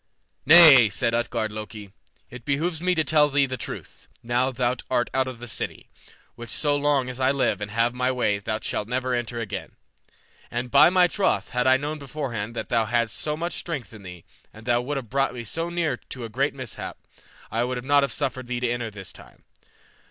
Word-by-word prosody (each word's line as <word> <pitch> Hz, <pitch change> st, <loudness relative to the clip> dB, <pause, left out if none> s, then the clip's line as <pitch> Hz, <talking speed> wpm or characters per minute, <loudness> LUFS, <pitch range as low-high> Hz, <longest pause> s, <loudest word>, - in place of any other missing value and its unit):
"Nay," 150 Hz, -8 st, +9 dB
said 115 Hz, +3 st, -1 dB
Utgard 115 Hz, -2 st, -1 dB
Loki, 105 Hz, -2 st, -8 dB, 0.4 s
"it 125 Hz, 0 st, -10 dB
behooves 155 Hz, +5 st, -1 dB
me 180 Hz, 0 st, +1 dB
to 160 Hz, -, +2 dB
tell 150 Hz, -1 st, +3 dB
thee 140 Hz, 0 st, +3 dB
the 130 Hz, -1 st, -4 dB
truth, 120 Hz, -, -8 dB, 0.2 s
now 120 Hz, +2 st, +1 dB
thou 125 Hz, -1 st, 0 dB
art 120 Hz, -2 st, 0 dB
out 130 Hz, 0 st, +1 dB
of 130 Hz, -2 st, -6 dB
the 120 Hz, -, -8 dB
city, -, -, -4 dB, 0.4 s
which 120 Hz, -1 st, -10 dB
so 145 Hz, +5 st, +1 dB
long 145 Hz, -2 st, +1 dB
as 125 Hz, 0 st, -7 dB
I 130 Hz, 0 st, +3 dB
live 135 Hz, -7 st, +1 dB
and 105 Hz, -, -4 dB
have 115 Hz, +2 st, +1 dB
my 125 Hz, +1 st, 0 dB
way 105 Hz, -5 st, 0 dB
thou 110 Hz, +2 st, -2 dB
shalt 105 Hz, -, -3 dB
never 125 Hz, +1 st, -1 dB
enter 120 Hz, -1 st, -2 dB
again. 105 Hz, -3 st, -5 dB, 0.8 s
And, 120 Hz, +1 st, -4 dB
by 145 Hz, +3 st, +7 dB
my 180 Hz, 0 st, +5 dB
troth, 190 Hz, +2 st, 0 dB
had 125 Hz, +1 st, +1 dB
I 130 Hz, 0 st, +6 dB
known 150 Hz, +3 st, -4 dB
beforehand 125 Hz, -6 st, -5 dB
that -, -, -5 dB
thou 115 Hz, -2 st, +2 dB
hadst 115 Hz, 0 st, 0 dB
so 150 Hz, 0 st, -2 dB
much 170 Hz, +2 st, -3 dB
strength 140 Hz, -, -5 dB
in 105 Hz, -, -11 dB
thee, 90 Hz, -3 st, -11 dB, 0.3 s
and 110 Hz, +1 st, -14 dB
wouldst 120 Hz, +4 st, 0 dB
have 130 Hz, -5 st, -5 dB
brought 135 Hz, -1 st, +1 dB
me 120 Hz, -, -5 dB
so 165 Hz, +9 st, -3 dB
near 165 Hz, -7 st, -1 dB
to 125 Hz, -1 st, -8 dB
a -, -, -7 dB
great 135 Hz, +5 st, 0 dB
mishap, 130 Hz, -4 st, -7 dB, 0.5 s
I 115 Hz, +2 st, 0 dB
would 125 Hz, 0 st, -3 dB
not 145 Hz, +1 st, +4 dB
have 140 Hz, -, 0 dB
suffered 130 Hz, -1 st, -3 dB
thee 120 Hz, -1 st, -3 dB
to 125 Hz, -1 st, 0 dB
enter 120 Hz, -1 st, -2 dB
this 95 Hz, -4 st, -9 dB
time. -, -, -15 dB
125 Hz, 210 wpm, -25 LUFS, 115-140 Hz, 0.8 s, Nay